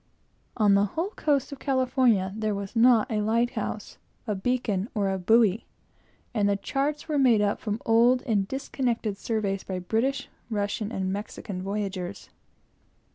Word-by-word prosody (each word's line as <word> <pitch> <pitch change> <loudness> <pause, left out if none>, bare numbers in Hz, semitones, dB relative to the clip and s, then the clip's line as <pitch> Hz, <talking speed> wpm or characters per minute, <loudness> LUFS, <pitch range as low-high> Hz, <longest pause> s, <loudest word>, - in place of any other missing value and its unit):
On 210 -3 +4
the 200 +1 +4
whole 330 - -3
coast 290 - 0
of 280 - -7
California 255 -8 +2
there 215 -1 -1
was 200 +2 -6
not 235 +1 +5
a 215 -1 0
lighthouse, 230 +3 -1 0.3
a 215 - -1
beacon, 210 -1 -1
or 200 -2 +1
a 190 - -2
buoy, 220 +2 +3 0.7
and 205 -3 +2
the 200 - +2
charts 280 +9 -2
were 300 -2 0
made 245 -5 +5
up 205 -1 +1
from 210 +1 -3
old 240 +3 +4
and 205 -6 0
disconnected 245 -4 -2
surveys 200 -2 -2
by 185 - -4
British, 225 +9 -1 0.2
Russian, 205 0 -2
and 190 -4 -2
Mexican 200 -2 -6
voyagers. 195 -1 -4
215 Hz, 150 wpm, -26 LUFS, 200-250 Hz, 0.7 s, not